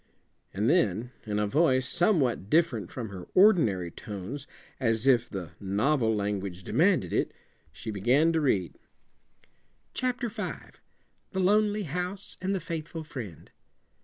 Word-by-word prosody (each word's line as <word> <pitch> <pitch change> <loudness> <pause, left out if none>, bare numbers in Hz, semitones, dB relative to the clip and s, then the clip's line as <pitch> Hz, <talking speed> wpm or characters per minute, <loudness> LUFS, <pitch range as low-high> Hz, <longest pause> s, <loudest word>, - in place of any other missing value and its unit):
And 105 +4 -1
then, 120 - +2 0.2
in 105 -1 -1
a 105 - +2
voice 130 +1 +2
somewhat 140 - +1
different 170 +4 +2
from 125 -9 -5
her 95 -2 -8
ordinary 135 - +4
tones, 105 - -7 0.3
as 115 -2 +1
if 125 -3 +4
the 95 -4 -6
"novel 110 +4 +1
language" 100 -3 -3
demanded - - +2
it, - - +1 0.4
she 80 +10 -6
began 125 - +3
to 160 - +2
read: 100 - 0 1.1
"'Chapter 250 -1 -1
Five. 215 - -7 0.5
The 190 - -1
Lonely 210 +2 +3
House 180 +4 -4
and 190 +1 0
the - - -1
Faithful 165 -1 -5
Friend. 115 - -8
130 Hz, 130 wpm, -28 LUFS, 100-170 Hz, 1.1 s, ordinary